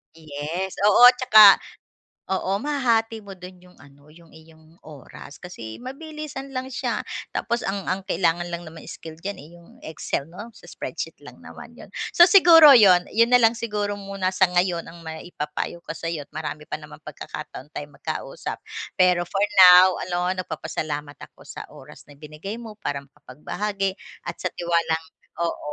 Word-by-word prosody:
Yes, 160 +4 -5 0.2
oo 210 +4 +5
at 250 - -20
saka 215 -5 +8 0.7
oo, 190 0 -2
mahahati 230 -5 0
mo 200 - -11
do'n 180 0 -13
yung 180 0 -20
ano, 145 +1 -19
yung 165 +1 -19
iyong 160 0 -19
oras 145 -1 -13
kasi 115 -12 -9
mabilisan 275 +1 -8
lang 255 0 -3
siya - - -2 0.4
tapos 235 0 -2
ang 195 0 -3
ang 190 +1 -2
kailangan 175 -2 0
lang 170 0 -5
naman 160 0 -12
skill 160 -1 -10
diyan, 200 +1 -5
eh, 150 - -13
yung 170 0 -18
Excel 155 -2 -5
'no, 205 +8 -11
sa 225 - -18
spreadsheet - - -6
lang - - -13
naman - - -12
'yon. - - -12 0.2
So, 345 0 +7
siguro 330 -6 +8
'yon, 185 -6 +6
'yon 230 +2 +4
na 250 - +6
lang 230 0 +4
siguro 210 -3 -3
muna 195 -2 -4
sa 185 -1 +3
ngayon 175 -1 0
ang 170 - -13
maipapayo 160 0 -6
ko 170 - -8
sa'yo 165 -3 -5
marami 155 -1 -6
pa - - -4
namang - - -13
pagkakataon 145 +4 -9
tayong 145 -1 -8
magkausap. - - -6 0.4
Pero 180 -1 +4
for 195 +3 -2 0.3
now 180 +1 +8 0.2
no, 175 0 -1
nagpapasalamat 150 -4 -5
ako - - -16
sa - - -8
oras - - -14
na 145 -1 -18
binigay 155 +9 -8
mo 220 -3 -10
para 140 - -2
makapagbahagi 190 +9 -5 0.3
at - - -4
sa - - -3
tiwalang 170 -2 -1 0.4
oo, 170 0 -2
180 Hz, 165 wpm, -23 LUFS, 160-215 Hz, 0.7 s, saka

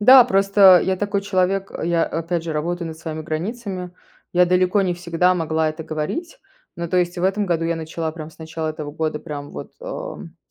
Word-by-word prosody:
Да, 255 +4 +9
просто 195 -4 +6
я 190 0 +1
такой 205 0 -1
человек, 195 0 0
я, 170 0 +2
опять 165 0 -2
же, 165 - -3
работаю 170 +3 -2
над 160 0 -8
своими 155 -1 -5
границами. 185 +3 -4 0.4
Я 180 0 +5
далеко 185 +2 +3
не 180 -2 0
всегда 175 +1 +1
могла 160 -2 0
это 160 +1 -7
говорить. 160 - -4 0.4
Но, 170 - -3
то 180 - 0
есть, 175 0 +1
в 180 - -1
этом 200 +1 +1
году 165 -2 0
я 170 0 +1
начала 160 0 -4
прям 160 -1 -8
с - - -22
начала 160 0 -4
этого 155 -2 -5
года, 155 -1 -2
прям 145 -3 -7
вот, - - -8
эм, - - -7
175 Hz, 200 wpm, -22 LUFS, 160-190 Hz, 0.4 s, Да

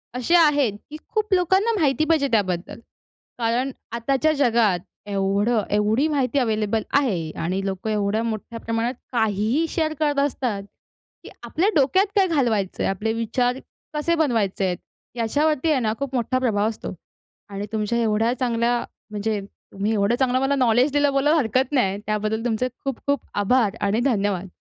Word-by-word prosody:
असे 255 +8 +2
आहेत, 290 - +4 0.2
की 305 - -7
खूप 430 -3 -1
लोकांना 380 +5 +3
माहिती 300 -1 +2
पाहिजे 310 -4 +3
त्याबद्दल. 185 -5 -1 0.6
कारण 240 +3 0 0.2
आताच्या 270 +6 +1
जगात 235 -9 +2 0.3
एवढं 200 +3 +1
एवढी 210 +7 +2
माहिती 280 -3 0
अवेलेबल 220 -2 0 0.2
आहे 180 - -1
आणि 185 +3 -1
लोकं 195 +2 -3
एवढ्या 210 +1 0
मोठ्या 230 +1 -4
प्रमाणात 230 +2 -1 0.2
काहीही 220 +5 +1
शेअर 315 -2 -1
करत 290 -2 +1
असतात 250 -7 -1 0.6
की - - -10
आपल्या 320 - +1
डोक्यात 295 +7 +4
काय 390 -2 +4
घालवायचंय? 235 - 0
आपले 210 +4 -1
विचार 245 +3 0 0.3
कसे 305 +3 +1
बनवायचेत? 205 - 0 0.4
याच्यावरती 290 +6 +1
आहे 285 - +3
ना, 220 -3 0
खूप 275 -1 -3
मोठा 255 +1 0
प्रभाव 215 -5 +1
असतो. 220 - -6 0.6
आणि 200 +1 -5
तुमच्या 220 +1 -1
एवढ्या 225 +1 +1
चांगल्या 240 -1 +1 0.3
म्हणजे 210 0 -1 0.3
तुम्ही 200 +2 -2
एवढं 205 +2 +2
चांगलं 255 0 +1
मला 270 +1 +1
नॉलेज 250 +1 +3
दिलं 290 0 +2
बोलायला 295 +4 +3
हरकत 260 +1 0
नाही. 200 -9 +1
त्याबद्दल 215 +2 -1
तुमचे 240 +1 0 0.2
खूप-खूप 275 +1 -1 0.2
आभार 215 -1 +2
आणि 205 +3 +1
धन्यवाद. 200 -7 0
235 Hz, 150 wpm, -23 LUFS, 210-280 Hz, 0.6 s, आहेत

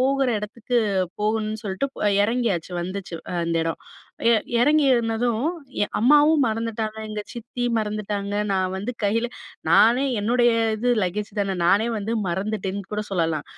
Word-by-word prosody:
போகிற 270 0 +2
இடத்துக்கு 220 +4 -3 0.4
போகணுன்னு 215 0 -1
சொல்லிட்டு 195 +6 -2 0.4
இறங்கியாச்சு 205 -6 0
வந்துச்சு, 185 0 -5 0.3
அந்த 165 0 -1
இடம். 165 0 -2 0.5
எ - - +6 0.3
எறங்கி 295 +4 +4
இருந்ததும் 230 +1 0 0.4
எ - - -5
அம்மாவும் 295 +4 +5
மறந்துட்டாங்க, 220 -1 -3
எங்க 215 0 -4
சித்தியும் 240 0 -3
மறந்துட்டாங்க, 210 -1 -3 0.2
நான் 185 -1 0
வந்து 205 +6 -3
கையில, 225 +4 +1 0.4
நானே 225 +8 +5 0.2
என்னுடைய 240 +2 +3 0.3
இது 245 +3 0
லக்கேஜ் 205 +4 -2
தான 195 -1 -1
நானே 205 +5 +3
வந்து 215 +3 -2
மறந்துட்டேன்னு 200 +1 -2
கூட 210 0 -2
சொல்லலாம். 165 -5 0
215 Hz, 135 wpm, -23 LUFS, 195-240 Hz, 0.5 s, எ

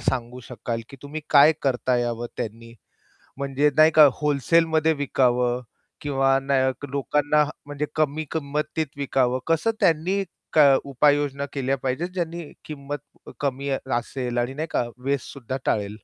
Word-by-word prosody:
सांगू 125 -1 -2
शकाल 120 -2 -4
की 135 - -12
तुम्ही 145 +2 -6
काय 145 +2 +7
करता 130 -2 +1
यावं 120 -1 -2
त्यांनी? 115 +2 -6 0.7
म्हणजे 140 +1 +1
नाही 155 +1 +7
का 155 -2 +9
होलसेलमध्ये 160 +2 +2
विकावं 125 -4 +1 0.4
किंवा 135 -2 +2
न 135 +1 -4 0.4
लोकांना 145 +2 +2 0.2
म्हणजे 145 +1 -3
कमी 155 0 0
किंमतीत 150 0 -2
विकावं? 130 -2 +1
कसं 165 +7 +2
त्यांनी 180 +5 +2 0.6
उपाययोजना 140 0 +1
केल्या 135 -1 0
पाहिजेत 130 +6 -2
ज्यांनी 170 -3 -4
किंमत 145 -1 -8
कमी 140 0 -2 0.3
असेल 120 0 -4
आणि 120 +2 0
नाही 155 +4 -4
का - - +1 0.2
वेस्टसुद्धां 135 -2 -3
टाळेल? 100 -2 0
140 Hz, 125 wpm, -24 LUFS, 130-150 Hz, 0.7 s, का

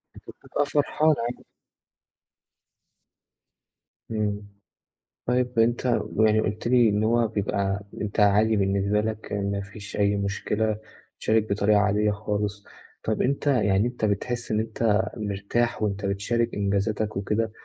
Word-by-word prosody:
أنت - - -14 0.2
بتبقى 145 - -1
فرحان 150 +2 +2
عادي. 120 +1 -5 2.7
إمم. 105 -1 -2 0.8
طيب 125 -1 0
أنت 120 +2 +2
ب 115 -2 0
يعني 110 0 +4
قُلت 105 +3 -3
لي 120 -2 +5
إن 105 +1 +1
هو 115 +1 +3
بيبقى 100 -2 -1 0.2
أنت 105 +1 -3
عادي 105 +2 +4
بالنسبة 100 +1 +1
لك 110 0 -4
ما 100 0 -1
فيش 100 +1 -9
أي 100 0 +2
مشكلة 105 +2 -1 0.4
تشارك 110 -1 +1
بطريقة 105 +1 +3
عادية 105 +1 +2
خالص، 105 -1 -3 0.4
طَب 110 -1 0
أنت 140 +3 0
يعني 105 -5 +3
أنت 120 -3 -2
بتحسّ 120 +4 -2
إن 105 - +2
أنت 110 -1 +1 0.2
مرتاح 105 +3 -1
وأنت 100 -1 -1
بتشارك 115 +4 0
إنجازاتك 100 +1 -1
وكده، 105 +3 -1
105 Hz, 130 wpm, -25 LUFS, 100-115 Hz, 2.7 s, لي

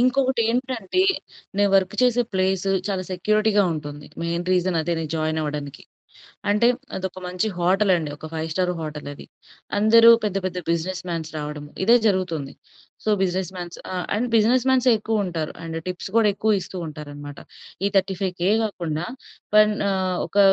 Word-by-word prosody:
ఇంకొకటేంటంటే 255 - +1 0.5
నేను 205 0 +4
వర్క్ 190 +1 +3
చేసే 245 -1 +4
ప్లేసు 190 0 +1 0.2
చాలా 190 -2 -1
సెక్యూరిటీగా 210 +3 +2
ఉంటుంది. 145 -1 -7 0.2
మెయిన్ 170 +1 -2
రీజన్ 180 -1 +1
అదే 160 +2 -1
నేను 155 -2 -4
జాయిన్ 155 0 -1
అవ్వడానికి. 145 -2 -5 0.7
అంటే 210 +3 +4 0.3
అదొక 190 0 -4
మంచి 180 +3 -1
హోటల్ 190 +4 +2
అండి. 155 -3 -3
ఒక 155 - -9
ఫైవ్ 160 0 -2
స్టార్ 180 +1 0
హోటల్ 150 -2 -6
అది. - - -11 0.5
అందరూ 230 +2 +7
పెద్ద 200 -2 -1
పెద్ద 185 -1 -2
బిజినెస్ 180 +2 -1
మాన్స్ 160 -2 -3
రావడం 150 0 -5 0.2
ఇదే 235 +4 +7
జరుగుతుంది. 180 -8 0 0.5
So, - - -2
business 185 -1 -1
మాన్స్. 175 -1 -6 0.2
ఆ! - - -3 0.2
అండ్ 245 +4 0
బిజినెస్ 240 +3 +3
మాన్సే 255 -1 +4
ఎక్కువ 215 -1 0
ఉంటారు. 165 -3 -3
అండ్ 165 0 -4
టిప్స్ 180 +1 -5
కూడా 220 -2 +5
ఎక్కువ 210 0 +2
ఇస్తూ 185 - -8
ఉంటారు 150 -1 -8
అన్నమాట. 145 0 -9 0.5
ఈ - - +4
35000 185 -1 -1
కాకుండా 170 -6 -3 0.5
పైన 215 0 +7 0.2
ఆహ్, 185 -2 0
ఒక 205 - -2
185 Hz, 160 wpm, -23 LUFS, 160-210 Hz, 0.7 s, అందరూ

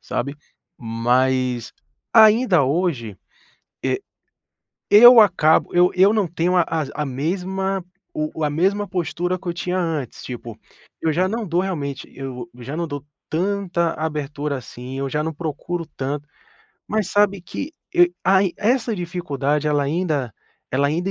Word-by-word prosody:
sabe. 140 +3 -3 0.4
Mas, 125 +1 0 0.4
ainda 220 - +6
hoje, 135 - -1 0.7
eh, - - 0 0.9
eu 240 +3 +10
acabo 165 -6 +3
eu 180 +1 +5
eu 195 +3 +6
não 210 -5 +1
tenho 175 +2 0
a 175 - +5
as 155 -4 -2
a 150 - -1
mesma 190 +7 -2 0.3
o 305 - -3
a 150 - +2
mesma 195 +7 +1
postura 180 0 -2
que 185 - -10
eu 170 - -1
tinha 180 +1 -2
antes, 160 -8 -3
tipo, 120 -3 -7 0.4
eu 160 -1 +1
já 185 +4 +2
não 225 -2 -3
dou 170 +2 +1
realmente 145 -8 -4
eu 125 -3 -7
já 135 +5 -6
não 170 - -1
dou 145 -1 -6 0.2
tanta 180 -1 0
abertura 150 -2 -3
assim, 125 +2 -8
eu 135 - -2
já 150 +2 -1
não 160 0 -3
procuro 165 +2 -4
tanto. 145 +2 -3 0.6
Mas 215 -3 0
sabe 205 -2 +2
que, 280 - -6 0.2
e 175 0 +5
ai 190 -1 +4
essa 230 +1 +1
dificuldade, 150 -5 -2
ela 145 -1 +2
ainda 145 - -1 0.4
ela 140 +2 +2
ainda 175 +6 -1
165 Hz, 150 wpm, -21 LUFS, 140-190 Hz, 0.9 s, eu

